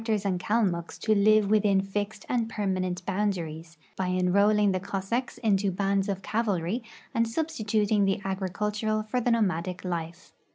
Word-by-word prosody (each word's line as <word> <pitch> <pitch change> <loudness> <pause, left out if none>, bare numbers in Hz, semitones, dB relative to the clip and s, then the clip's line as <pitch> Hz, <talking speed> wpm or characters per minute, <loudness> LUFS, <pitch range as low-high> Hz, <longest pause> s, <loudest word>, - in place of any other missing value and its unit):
4 225 -1 0
RUSSIA - - +4
IX 205 - -3
EUROPE 200 -2 +1
and 180 - -2
Kalmucks 185 -5 0
to 215 - +1
live 215 0 +4
within 205 -2 +4
fixed 205 +2 -4
and 235 -2 0
permanent 185 -4 -2
boundaries, 170 -5 -2 0.2
by 190 - -1
enrolling 200 +3 +3
tlie 185 - -1
Cossacks 200 +6 -3
into 200 -3 +2
bands 195 +1 0
of 195 -1 -3
cavalry, 210 -1 -1 0.3
and 230 0 +2
substituting 220 -7 0
the 195 - +1
agricultural 210 +3 -1
for 230 +4 -1
the 245 - +1
nomadic 185 -6 0
life. 170 0 -5
200 Hz, 165 wpm, -27 LUFS, 185-215 Hz, 0.3 s, RUSSIA